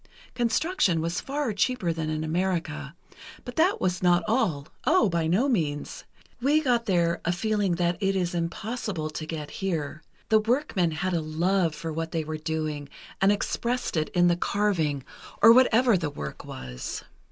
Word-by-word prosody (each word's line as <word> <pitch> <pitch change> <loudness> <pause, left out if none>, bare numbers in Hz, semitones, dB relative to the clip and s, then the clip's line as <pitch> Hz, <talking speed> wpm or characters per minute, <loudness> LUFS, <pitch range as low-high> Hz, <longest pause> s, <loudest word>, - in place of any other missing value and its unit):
Construction 240 - +1
was 170 +2 -2
far 275 -4 -2
cheaper 205 -4 0
than 160 -1 -3
in 155 0 -2
America, 160 -3 -2 0.5
but 245 - -7
that 350 +5 +3
was 180 -1 0
not 175 -1 +4
all—oh, 220 - +1
by 170 -2 0
no 200 +12 +2
means! 155 - -2 0.4
We 290 +5 +4
got 245 -6 +1
there 170 -3 +2
a 175 - +1
feeling 205 0 0
that 175 0 0
it 195 0 +1
is 180 -2 0
impossible 170 -1 -3
to 155 +1 -5
get 155 -2 -5
here: 165 -4 -2 0.3
the 220 -1 +6
workmen 220 - +1
had 170 +4 -2
a 170 - +1
love 165 +2 +1
for 160 +1 -5
what 165 +2 -4
they 165 -1 0
were 155 0 -4
doing 155 -2 -3 0.3
and 195 +1 +5
expressed 235 +3 -1
it 155 -1 0
in 175 -1 +3
the 175 - +4
carving, 170 -8 0 0.4
or 230 +2 +9
whatever 245 -2 +5
the 165 -5 -1
work 75 - -7
was." 65 -1 -6
175 Hz, 165 wpm, -26 LUFS, 160-220 Hz, 0.5 s, or